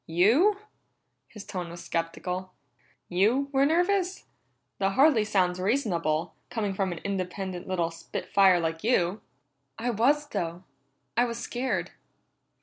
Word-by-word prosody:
"You?" 230 Hz, -, +4 dB, 0.7 s
His 210 Hz, -2 st, -11 dB
tone 180 Hz, -2 st, -5 dB
was 170 Hz, +1 st, -9 dB
skeptical. 180 Hz, +3 st, -3 dB, 0.5 s
"You 225 Hz, +10 st, +2 dB
were 275 Hz, 0 st, +3 dB
nervous? 365 Hz, +3 st, +1 dB, 0.5 s
That 195 Hz, 0 st, +1 dB
hardly 270 Hz, -2 st, +5 dB
sounds 185 Hz, -4 st, +1 dB
reasonable, 180 Hz, -, 0 dB, 0.2 s
coming 210 Hz, -4 st, -2 dB
from 190 Hz, -1 st, -1 dB
an 175 Hz, -, -4 dB
independent 190 Hz, -2 st, -4 dB
little 175 Hz, -3 st, 0 dB
spit 165 Hz, 0 st, -6 dB
fire 190 Hz, -3 st, +5 dB
like 165 Hz, -1 st, -2 dB
you." 205 Hz, -4 st, +1 dB, 0.6 s
"I 245 Hz, +2 st, -1 dB
was, 280 Hz, +7 st, +2 dB
though. 170 Hz, +1 st, -3 dB, 0.5 s
I 240 Hz, -, +4 dB
was 235 Hz, -1 st, -4 dB
scared." 250 Hz, +2 st, -2 dB
195 Hz, 130 wpm, -27 LUFS, 175-245 Hz, 0.7 s, hardly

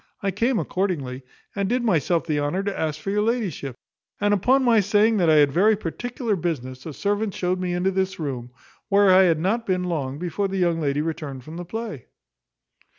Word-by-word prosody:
I 195 Hz, -, +1 dB
came 230 Hz, +6 st, +1 dB
accordingly, 155 Hz, -12 st, -2 dB, 0.3 s
and 200 Hz, -1 st, -1 dB
did 245 Hz, +1 st, +1 dB
myself 170 Hz, -, +1 dB
the 150 Hz, -2 st, 0 dB
honour 145 Hz, +7 st, -1 dB
to 200 Hz, 0 st, -2 dB
ask 155 Hz, -1 st, -2 dB
for 195 Hz, +5 st, -4 dB
your 210 Hz, +1 st, +1 dB
ladyship; 210 Hz, -, -2 dB, 0.4 s
and 205 Hz, 0 st, +2 dB
upon 255 Hz, +7 st, +3 dB
my 235 Hz, -3 st, +5 dB
saying 210 Hz, +3 st, +3 dB
that 175 Hz, -4 st, +3 dB
I 155 Hz, -, +6 dB
had 145 Hz, -2 st, +5 dB
very 210 Hz, +8 st, +4 dB
particular 230 Hz, -, -3 dB
business, 135 Hz, -6 st, -4 dB
a 155 Hz, -, -6 dB
servant 205 Hz, +4 st, -1 dB
showed 180 Hz, 0 st, -1 dB
me 180 Hz, -1 st, -2 dB
into 185 Hz, +2 st, +1 dB
this 190 Hz, 0 st, -1 dB
room; 130 Hz, -6 st, -4 dB, 0.4 s
where 200 Hz, -1 st, +5 dB
I 190 Hz, +1 st, +7 dB
had 165 Hz, -3 st, +3 dB
not 220 Hz, +7 st, 0 dB
been 185 Hz, -1 st, +1 dB
long 145 Hz, -7 st, -2 dB
before 180 Hz, +4 st, -2 dB
the 195 Hz, 0 st, -3 dB
young 170 Hz, -3 st, +1 dB
lady 145 Hz, 0 st, 0 dB
returned 150 Hz, -5 st, -5 dB
from 155 Hz, +5 st, -10 dB
the 175 Hz, -, -6 dB
play." 220 Hz, -, -6 dB
185 Hz, 205 wpm, -24 LUFS, 155-205 Hz, 0.4 s, I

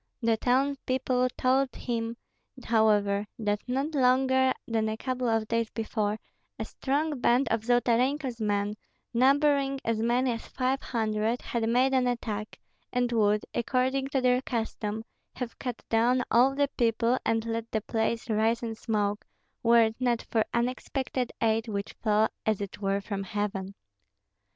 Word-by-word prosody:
The 230 Hz, 0 st, +3 dB
townspeople 255 Hz, 0 st, +1 dB
told 260 Hz, +1 st, +2 dB
him, 230 Hz, -1 st, -3 dB, 0.5 s
however, 210 Hz, -2 st, +2 dB
that 210 Hz, -2 st, -1 dB
not 270 Hz, +5 st, -1 dB
longer 260 Hz, 0 st, +3 dB, 0.2 s
than 220 Hz, -1 st, 0 dB
a 220 Hz, -, -3 dB
couple 255 Hz, 0 st, -2 dB
of 225 Hz, -1 st, +1 dB
days 230 Hz, 0 st, 0 dB
before, 215 Hz, -2 st, -2 dB, 0.4 s
a -, -, -3 dB
strong 290 Hz, +1 st, -1 dB
band 250 Hz, +3 st, +3 dB
of 225 Hz, 0 st, +1 dB
Zolotarenko's 245 Hz, +2 st, +1 dB
men, 205 Hz, -1 st, 0 dB, 0.4 s
numbering 275 Hz, +2 st, +3 dB
as 230 Hz, -1 st, 0 dB
many 245 Hz, +2 st, +2 dB
as 230 Hz, -1 st, -5 dB
five 260 Hz, +1 st, -1 dB
hundred, 220 Hz, 0 st, -1 dB
had 230 Hz, -2 st, -1 dB
made 255 Hz, +3 st, +3 dB
an 255 Hz, -1 st, +3 dB
attack, 220 Hz, -3 st, -3 dB, 0.3 s
and 245 Hz, -1 st, 0 dB
would, 210 Hz, -2 st, +2 dB
according 260 Hz, +3 st, 0 dB
to 275 Hz, -1 st, 0 dB
their 250 Hz, 0 st, +3 dB
custom, 225 Hz, -3 st, -3 dB, 0.3 s
have 245 Hz, -2 st, -6 dB
cut 250 Hz, -3 st, -5 dB
down 240 Hz, +3 st, +3 dB
all 255 Hz, +4 st, +5 dB
the 285 Hz, 0 st, +2 dB
people, 235 Hz, +1 st, +2 dB
and 225 Hz, 0 st, 0 dB
let 230 Hz, 0 st, -3 dB
the 220 Hz, -, -1 dB
place 225 Hz, +1 st, -1 dB
rise 225 Hz, +1 st, +1 dB
in 225 Hz, -1 st, -2 dB
smoke, 210 Hz, -2 st, -1 dB, 0.4 s
were 235 Hz, 0 st, +6 dB
it 220 Hz, 0 st, 0 dB
not 245 Hz, -2 st, +1 dB
for 220 Hz, -2 st, +3 dB
unexpected 255 Hz, +1 st, -2 dB
aid 225 Hz, +1 st, +2 dB
which 200 Hz, -2 st, -4 dB
fell 215 Hz, 0 st, +3 dB, 0.2 s
as 215 Hz, -2 st, +1 dB
it 200 Hz, -1 st, -6 dB
were 195 Hz, 0 st, 0 dB
from 200 Hz, 0 st, -4 dB
heaven. 195 Hz, -1 st, -3 dB
235 Hz, 150 wpm, -28 LUFS, 220-255 Hz, 0.5 s, were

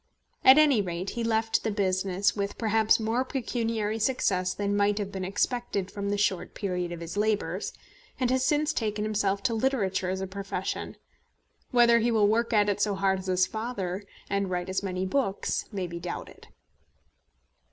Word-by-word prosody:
At 260 Hz, +2 st, +9 dB
any 290 Hz, -8 st, +5 dB
rate 180 Hz, 0 st, -4 dB
he 235 Hz, -, -3 dB
left 225 Hz, 0 st, +1 dB
the -, -, 0 dB
business 190 Hz, -1 st, +1 dB
with 200 Hz, -1 st, -3 dB
perhaps 220 Hz, 0 st, +3 dB
more 225 Hz, +3 st, 0 dB
pecuniary 230 Hz, -4 st, -2 dB
success 195 Hz, -6 st, +1 dB
than 205 Hz, +1 st, -1 dB
might 205 Hz, 0 st, +2 dB
have 200 Hz, -2 st, -3 dB
been 190 Hz, -2 st, -4 dB
expected 200 Hz, 0 st, -1 dB
from 200 Hz, -1 st, -3 dB
the 205 Hz, -, 0 dB
short 200 Hz, -3 st, 0 dB
period 180 Hz, -3 st, -2 dB
of 170 Hz, -1 st, -6 dB
his 170 Hz, +3 st, -6 dB
labours, 210 Hz, 0 st, 0 dB, 0.5 s
and 255 Hz, -1 st, +1 dB
has 260 Hz, 0 st, +2 dB
since 300 Hz, +3 st, +2 dB
taken 215 Hz, -4 st, -1 dB
himself 200 Hz, -2 st, 0 dB
to 250 Hz, -2 st, +1 dB
literature 215 Hz, -7 st, 0 dB
as 190 Hz, 0 st, -2 dB
a 190 Hz, -, -2 dB
profession. 195 Hz, +1 st, -4 dB, 0.7 s
Whether 235 Hz, -1 st, +5 dB
he 235 Hz, +1 st, +1 dB
will 220 Hz, -3 st, +4 dB
work 230 Hz, +2 st, +1 dB
at 210 Hz, -2 st, +4 dB
it 205 Hz, 0 st, 0 dB
so 205 Hz, -1 st, +1 dB
hard 190 Hz, 0 st, +1 dB
as 190 Hz, -, -8 dB
his 185 Hz, 0 st, +3 dB
father, 205 Hz, -4 st, -4 dB, 0.3 s
and 200 Hz, -1 st, -1 dB
write 180 Hz, 0 st, -2 dB
as 190 Hz, -, -1 dB
many 185 Hz, -1 st, -2 dB
books, 195 Hz, -1 st, -1 dB
may 195 Hz, -3 st, -3 dB
be 170 Hz, -1 st, -6 dB
doubted. -, -, -7 dB
205 Hz, 180 wpm, -28 LUFS, 190-225 Hz, 0.7 s, At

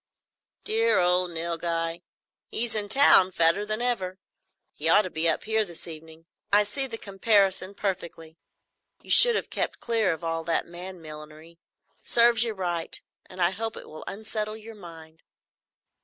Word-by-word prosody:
"Dear 450 Hz, +2 st, +2 dB
old 180 Hz, 0 st, +2 dB
Nilghai! 165 Hz, 0 st, -3 dB, 0.5 s
He's 235 Hz, 0 st, -2 dB
in 205 Hz, -2 st, +2 dB
town, 200 Hz, -9 st, +7 dB
fatter 170 Hz, +4 st, +2 dB
than 215 Hz, +3 st, 0 dB
ever. 190 Hz, -7 st, -1 dB, 0.6 s
He -, -, 0 dB
ought 210 Hz, -, +6 dB
to 185 Hz, -, -6 dB
be 160 Hz, +1 st, +3 dB
up 160 Hz, -, 0 dB
here 220 Hz, 0 st, +1 dB
this 175 Hz, -4 st, -9 dB
evening. 160 Hz, 0 st, -11 dB, 0.3 s
I 205 Hz, +1 st, +5 dB
see 270 Hz, +7 st, -3 dB
the 230 Hz, -3 st, -7 dB
comparison 195 Hz, -2 st, +1 dB
perfectly. 170 Hz, -5 st, -5 dB, 0.6 s
You -, -, -8 dB
should 480 Hz, -2 st, +6 dB
have -, -, -3 dB
kept -, -, -2 dB
clear 225 Hz, -4 st, +1 dB
of 165 Hz, +1 st, -6 dB
all 165 Hz, 0 st, -3 dB
that 165 Hz, -, 0 dB
man 175 Hz, 0 st, -10 dB
millinery. 155 Hz, +2 st, -12 dB, 0.4 s
Serves 235 Hz, -1 st, +3 dB
you 225 Hz, -2 st, -2 dB
right; 175 Hz, -3 st, -3 dB, 0.3 s
and 185 Hz, -, -13 dB
I 175 Hz, 0 st, +2 dB
hope 225 Hz, +3 st, -4 dB
it -, -, -10 dB
will 155 Hz, -, -10 dB
unsettle 215 Hz, +1 st, -4 dB
your 225 Hz, +1 st, -11 dB
mind." 165 Hz, -5 st, -13 dB
185 Hz, 160 wpm, -26 LUFS, 165-215 Hz, 0.6 s, town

